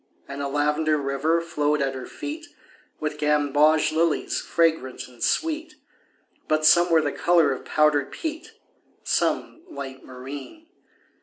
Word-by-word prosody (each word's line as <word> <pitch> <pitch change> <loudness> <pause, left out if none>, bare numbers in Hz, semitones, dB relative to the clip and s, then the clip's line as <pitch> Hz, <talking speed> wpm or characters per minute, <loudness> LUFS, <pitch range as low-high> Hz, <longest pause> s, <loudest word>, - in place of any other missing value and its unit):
And 140 0 -6
a 140 - -2
lavender 150 +2 +1
river 140 +4 0
flowed 150 -3 0
at 135 -1 0
her 130 -1 -7
feet 320 +3 -7 0.5
With 150 -1 -4
gamboge 150 +1 +3
lilies 160 0 0
fragrant 160 -6 0
and 125 -2 -18
sweet, 320 -1 -1 0.7
But 155 0 +1
some 175 +2 +6
were 165 -2 +4
the 145 - -1
color 170 -3 +3
of 130 - -5
powdered 150 -2 +2
peat, 320 +7 -6 0.5
Some - - -1
light 135 - -8
marine. 135 - -9
150 Hz, 135 wpm, -24 LUFS, 140-170 Hz, 0.7 s, some